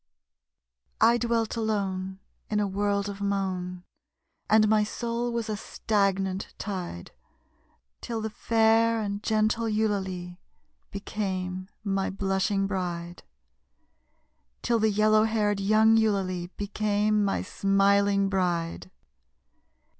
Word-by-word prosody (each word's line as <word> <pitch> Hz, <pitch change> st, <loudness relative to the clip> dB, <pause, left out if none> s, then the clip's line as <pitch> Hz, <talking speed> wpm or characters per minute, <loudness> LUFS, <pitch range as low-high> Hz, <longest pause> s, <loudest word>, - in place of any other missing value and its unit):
I 235 Hz, +1 st, +5 dB
dwelt 230 Hz, -1 st, 0 dB
alone 195 Hz, -4 st, -2 dB, 0.3 s
In 210 Hz, -, +1 dB
a 205 Hz, -, +2 dB
world 200 Hz, +1 st, 0 dB
of 200 Hz, 0 st, -6 dB
moan, 185 Hz, -3 st, -2 dB, 0.7 s
And 215 Hz, 0 st, +5 dB
my 215 Hz, 0 st, +4 dB
soul 235 Hz, +2 st, -3 dB
was 235 Hz, -1 st, -2 dB
a 215 Hz, -, -2 dB
stagnant 195 Hz, -3 st, -1 dB
tide, 180 Hz, -, -5 dB, 0.9 s
Till 230 Hz, -1 st, -4 dB
the 220 Hz, 0 st, -4 dB
fair 225 Hz, +1 st, +3 dB
and 200 Hz, -1 st, -3 dB
gentle 220 Hz, +1 st, +1 dB
Eulalie 190 Hz, -5 st, -2 dB, 0.5 s
became 185 Hz, -2 st, -4 dB
my 195 Hz, -2 st, 0 dB
blushing 195 Hz, +1 st, 0 dB
bride 175 Hz, -3 st, -4 dB, 1.4 s
Till 235 Hz, -1 st, +2 dB
the 220 Hz, 0 st, +3 dB
yellow 215 Hz, +1 st, +4 dB
haired 210 Hz, -2 st, +1 dB
young 215 Hz, +3 st, +4 dB
Eulalie 190 Hz, -5 st, 0 dB
became 210 Hz, +1 st, +1 dB
my 195 Hz, -, 0 dB
smiling 200 Hz, 0 st, +2 dB
bride. 175 Hz, -3 st, -1 dB
200 Hz, 105 wpm, -27 LUFS, 190-215 Hz, 1.4 s, I